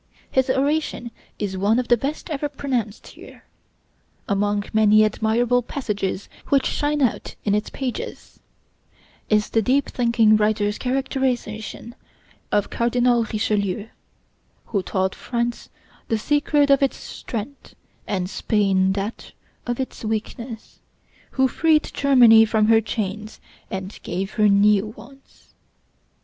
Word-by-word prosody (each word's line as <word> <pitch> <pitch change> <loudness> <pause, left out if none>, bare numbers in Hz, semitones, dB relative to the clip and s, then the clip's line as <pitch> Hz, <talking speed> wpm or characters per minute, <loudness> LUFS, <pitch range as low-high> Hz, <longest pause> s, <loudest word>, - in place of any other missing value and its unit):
His 260 0 +1
oration 275 -3 0 0.3
is 200 -2 -3
one 205 +4 +2
of 250 - -1
the 240 - +5
best 285 +7 -4
ever 295 0 -2
pronounced 255 -7 -3
here. - - -14 0.8
Among 205 0 0
many 215 0 +5
admirable 230 +3 +1
passages 205 -7 -3 0.2
which 275 -2 +3
shine 295 -1 0
out 245 - -1
in 205 - +2
its 210 +1 0
pages 260 -3 -6 0.9
is 210 -1 +2
the 225 - +3
deep 265 +6 +1
thinking 230 -3 +3
writer's 210 -1 0
characterization 250 -4 -2 0.6
of 205 -1 +1
Cardinal 240 0 +2
Richelieu, 210 -1 -1 0.8
"who 200 -4 -1
taught 190 0 -1
France 235 -1 -3 0.4
the 225 - +1
secret 290 +3 +2
of 275 - +5
its 275 - +1
strength, 240 +5 -7 0.3
and 185 -3 -1
Spain 190 -1 +1
that 200 +3 -5 0.3
of 240 +1 -2
its 260 - -5
weakness; 225 +1 -5 0.5
who 265 -1 +2
freed 310 +2 +2
Germany 245 -5 +6
from 215 -1 +2
her 225 0 +6
chains 215 -1 -4 0.3
and 190 +1 -6
gave 190 +3 -4
her 210 -2 +3
new 200 +1 +4
ones." 245 +6 -16
225 Hz, 125 wpm, -22 LUFS, 210-260 Hz, 0.9 s, Germany